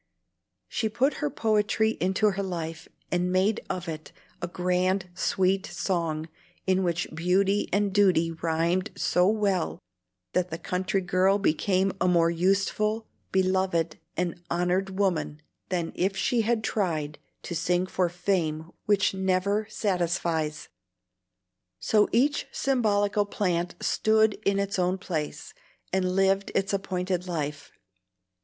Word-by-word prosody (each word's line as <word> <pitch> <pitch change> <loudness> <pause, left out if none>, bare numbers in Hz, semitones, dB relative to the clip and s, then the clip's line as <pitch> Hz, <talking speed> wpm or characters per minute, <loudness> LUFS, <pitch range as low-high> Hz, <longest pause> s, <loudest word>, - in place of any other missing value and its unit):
She 220 - -1
put 250 +7 +1
her 295 - +1
poetry 220 -2 +1
into 195 +3 +2
her 195 +1 -3
life, 165 -4 -5 0.2
and 180 0 +1
made 190 +4 +2
of 180 -1 -3
it 155 -1 -6 0.3
"a 175 - -2
grand 180 +1 0
sweet 190 +1 +1
song" 165 -4 -2 0.4
in 190 0 +2
which 175 -1 0
beauty 190 +5 +1
and 200 0 +1
duty 180 -5 +4
rhymed 165 +4 0
so 180 +1 +3
well 200 -4 +1 0.6
that 180 0 +1
the 160 - -4
country 185 +3 -1
girl 185 +2 +3
became 190 +1 +1
a 180 - +3
more 170 -2 +4
useful, 195 +5 +1 0.3
beloved, 185 -3 +1 0.2
and 175 -1 -2
honored 185 +2 0
woman 180 -6 0 0.3
than 175 -3 -1
if 195 +2 0
she 235 +4 +2
had 225 0 0
tried 155 -9 -1 0.2
to - - -5
sing 175 +2 +1
for 185 -1 0
fame 170 -3 -1 0.2
which 205 -2 +3
never 190 +2 0
satisfies. 170 -5 -1 1.1
So 210 -1 +3
each 285 +5 +2
symbolical 205 -5 +1
plant 175 -4 -1
stood 220 0 +3
in 200 0 +2
its 200 -1 -1
own 180 +1 +1
place, 160 -6 -4 0.4
and 185 -1 +1
lived 195 0 +2
its 195 +1 +1
appointed 185 -2 -2
life. 150 -4 -4
185 Hz, 130 wpm, -27 LUFS, 175-200 Hz, 1.1 s, duty